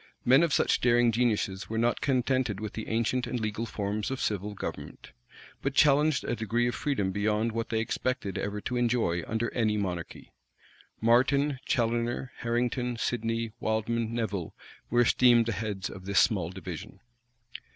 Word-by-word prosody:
Men 130 +5 +6
of 170 -2 +2
such - - +2
daring 120 -1 +4
geniuses 105 -5 0
were 110 - -3
not 120 +1 +1
contented 130 -5 +1
with 110 -1 -5
the 110 - -6
ancient 115 +3 0
and 125 - -2
legal 110 +1 -3
forms 105 0 -3
of 135 -1 -3
civil 105 0 -2
government; - - -7 0.5
but 135 0 -2
challenged 150 0 +4
a 120 - -1
degree 115 +2 0
of 120 - -1
freedom 130 -11 -1
beyond 105 +3 0
what 115 0 -3
they 110 - 0
expected 115 -3 -2
ever 105 +1 -3
to 125 - -3
enjoy 115 -8 +1
under 110 +2 -2
any 110 -3 +1
monarchy. 90 -4 -4 0.7
Martin, 130 +4 +3
Challoner, 120 +2 0
Harrington, 120 +1 -1
Sidney, 115 -1 -1
Wildman, 110 +1 -1
Nevil, 105 -7 -3 0.3
were 120 +1 +3
esteemed 120 -1 +5
the 115 - -1
heads 100 -1 -3
of 95 -1 -10
this 100 - +3
small 95 -8 +2
division. 95 -1 -8
115 Hz, 160 wpm, -28 LUFS, 105-120 Hz, 0.7 s, Men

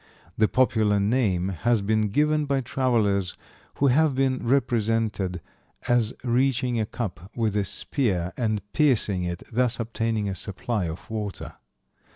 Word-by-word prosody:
The 110 - +3
popular 110 -5 +2
name 100 -4 +1
has 110 +5 +1
been 110 +1 +1
given 150 +6 +2
by 140 -1 0
travelers 110 -8 0 0.4
who 140 - +1
have 140 +2 +3
been 130 -1 +1
represented 115 -7 0 0.5
as 120 -2 +2
reaching 125 0 +1
a 110 - -1
cup 95 -6 -5
with 110 -3 0
a 105 - +2
spear 95 - -1
and 110 -5 -1
piercing 115 - +2
it, 85 0 -4
thus 125 +1 +1
obtaining 115 -2 -1
a 100 - -2
supply 100 +2 -3
of 80 +1 -6
water. 105 -3 -5
110 Hz, 140 wpm, -25 LUFS, 100-125 Hz, 0.5 s, The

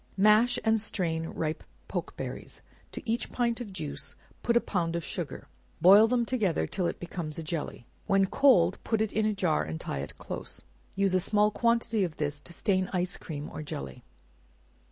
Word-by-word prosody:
Mash 215 +5 +5
and 220 -1 +3
strain 165 -6 -1
ripe 155 -1 -3 0.2
pokeberries; - - -5 0.3
to - - -8
each 230 +1 -1
pint 240 -1 0
of 215 -5 -6
juice 145 -5 -4 0.3
put 235 0 +3
a - - +6
pound 170 -7 -1
of 170 - -2
sugar; - - -5 0.3
boil 200 +6 +8
them 240 0 +2
together 215 -9 +1
till 180 -3 -1
it - - -4
becomes 170 -3 -5
a 165 - -4
jelly; 155 -6 -4 0.2
when 195 -2 +4
cold 190 -6 +4
put 225 - 0
it 220 -2 0
in 215 0 +2
a 215 - +1
jar 180 -5 +2
and 80 +1 -5
tie 70 - -4
it 70 - -6
close; - - -5 0.3
use 195 -1 +2
a 185 - +4
small 210 +3 +3
quantity 230 -2 +2
of 170 -4 -3
this 145 -1 -2
to - - -9
stain 185 +2 +1
ice 180 -1 0
cream 150 -2 -6
or - - -6
jelly. 70 - -6
190 Hz, 185 wpm, -29 LUFS, 160-220 Hz, 0.3 s, boil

